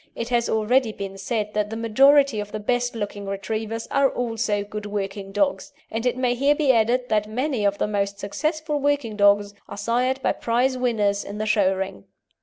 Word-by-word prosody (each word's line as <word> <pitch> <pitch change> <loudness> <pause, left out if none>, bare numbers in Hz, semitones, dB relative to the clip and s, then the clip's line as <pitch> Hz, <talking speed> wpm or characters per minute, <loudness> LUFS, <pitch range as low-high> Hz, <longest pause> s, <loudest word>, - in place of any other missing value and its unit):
It 230 +1 -4
has 240 -1 +1
already 225 +2 +2
been 195 -2 -6
said 210 +1 -2
that 210 0 0
the 225 - -5
majority 270 +2 +4
of 205 0 -5
the 215 - -4
best 245 +3 -1
looking 205 -2 -5
Retrievers 220 +3 -4
are 275 -1 +3
also 225 -4 -1
good 210 0 -6
working 195 -1 -4
dogs, 195 -1 0 0.2
and 225 +3 -1
it 250 - 0
may 250 -1 +1
here 275 +4 +2
be 290 -3 +3
added 245 +2 +2
that 210 -1 +1
many 250 0 -1
of 200 0 +1
the - - 0
most 200 -1 -1
successful 305 - -2
working 285 -6 0
dogs 205 0 +3 0.2
are - - -7
sired 245 +5 0
by - - +3
prize 245 +3 0
winners 215 -5 0
in 205 - -7
the 215 - -2
show 210 -3 +3
ring. 190 - -5
220 Hz, 200 wpm, -23 LUFS, 205-250 Hz, 0.2 s, majority